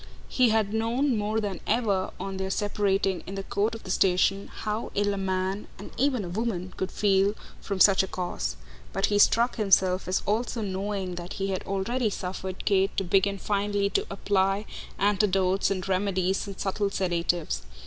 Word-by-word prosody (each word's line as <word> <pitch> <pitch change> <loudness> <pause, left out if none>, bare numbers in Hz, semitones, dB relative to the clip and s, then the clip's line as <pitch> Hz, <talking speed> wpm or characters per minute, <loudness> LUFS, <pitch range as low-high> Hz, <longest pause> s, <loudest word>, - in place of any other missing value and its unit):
He 250 -2 +4
had 215 -2 +1
known 235 +4 +1
more 215 +1 0
than 200 -4 -3
ever, 205 -5 +1
on 195 -1 -4
their 190 0 -2
separating 195 -2 0
in 195 - -5
the 195 - -4
court 210 +3 -1
of 225 - -10
the 185 - -5
station, 190 +1 +2
how 215 +1 -4
ill 205 0 +1
a - - -3
man, 190 +1 -2
and 200 - -10
even 255 -5 +1
a - - -6
woman, 185 -2 -3
could 190 - -3
feel 200 0 +2 0.3
from 200 -2 -3
such 195 0 +7
a 190 - -2
cause; 180 - -3 0.4
but - - +2
he 205 - +3
struck 235 +4 +4
himself 190 -3 +3
as 185 - 0
also 225 +2 -1
knowing 195 -1 -3
that 175 - -7
he 195 0 -2
had 190 -1 -2
already 215 +5 0
suffered 185 -1 -5
Kate 195 -1 +2
to 195 - +1
begin 195 +2 +2
finely 200 0 0
to - - 0
apply 195 +1 +1 0.3
antidotes 195 -2 +2
and 190 -1 -2
remedies 190 0 0
and 195 -1 -8
subtle 200 +1 0
sedatives. 175 - -1
195 Hz, 180 wpm, -27 LUFS, 190-210 Hz, 0.4 s, such